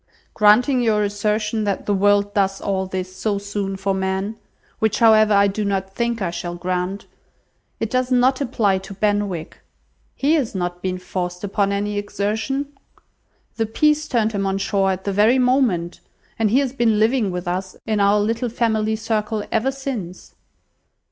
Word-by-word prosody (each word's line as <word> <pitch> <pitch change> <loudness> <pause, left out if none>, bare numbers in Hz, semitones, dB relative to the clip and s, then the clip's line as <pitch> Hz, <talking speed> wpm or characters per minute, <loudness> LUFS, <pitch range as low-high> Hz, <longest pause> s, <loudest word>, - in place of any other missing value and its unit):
"Granting 245 +5 +4
your 215 -3 +2
assertion 210 +2 -1
that 200 -2 -2
the 205 - +1
world 205 +1 +2
does 195 -1 +1
all 190 -1 -2
this 185 0 -5
so 205 +1 -1
soon 200 -1 -4
for 195 0 -1
men 190 +2 -2 0.4
(which, 220 -2 +1
however, 220 -2 +5
I 200 0 +5
do 200 +2 -1
not 195 -1 -2
think 235 -1 -1
I 170 - -1
shall 175 0 -5
grant), 180 +2 -3 0.7
it 225 - -2
does 255 0 0
not 255 +2 +3
apply 220 -7 +1
to 195 +1 -10
Benwick. 205 -5 -1 0.6
He 285 +3 +2
has 275 -10 0
not 175 -1 -3
been 185 -1 -2
forced 180 0 -5
upon 200 0 0
any 205 +1 -1
exertion. 220 +8 -2 0.8
The 225 -1 0
peace 300 +6 +2
turned 225 -5 +1
him 200 -2 -1
on 195 0 0
shore 195 0 +1
at 190 0 -2
the 200 - -2
very 215 +6 +4
moment, 245 -10 +1 0.4
and 220 -2 +2
he 235 - +3
has 265 -3 -2
been 235 -5 +2
living 220 0 +2
with 180 0 -5
us, 185 +1 -3
in 215 -2 0
our 200 +1 +4
little 230 +4 -1
family 220 -2 0
circle, 220 -1 -2
ever 265 +4 +1
since." 255 -10 -6
205 Hz, 170 wpm, -21 LUFS, 195-225 Hz, 0.8 s, however